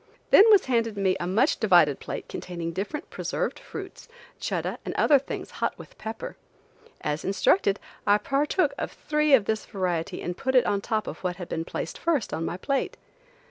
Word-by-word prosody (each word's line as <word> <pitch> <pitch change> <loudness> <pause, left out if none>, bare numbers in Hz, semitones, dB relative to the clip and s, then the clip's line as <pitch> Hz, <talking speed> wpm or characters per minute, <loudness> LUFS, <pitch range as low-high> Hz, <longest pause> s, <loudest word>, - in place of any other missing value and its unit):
Then 430 +3 +8
was 410 -3 +6
handed 230 -4 0
me 190 -2 +2
a 175 - -2
much 225 - +2
divided 175 - +5
plate - - -6
containing 170 -2 -5
different 205 - -5
preserved - - -2
fruits, - - -9 0.3
chuddah - - -2
and - - -5
other 285 -2 +5
things 270 - -6
hot - - 0
with - - -13
pepper. 220 +1 -6 0.6
As 150 +1 -2
instructed, 195 +1 +2 0.3
I 205 0 +6
partook 280 - +1
of - - -3
three 300 -1 +3
of 220 -6 +1
this 220 +1 -2
variety 180 -4 -2
and 175 - -3
put 260 +5 -1
it 250 -1 +6
on 200 -1 +1
top 215 +1 -1
of - - -6
what 180 -1 -1
had 175 -1 -8
been 165 0 -2
placed 165 - -5
first 320 -9 0
on 165 - -2
my 175 - -3
plate. 275 +8 -1
205 Hz, 185 wpm, -26 LUFS, 180-270 Hz, 0.6 s, Then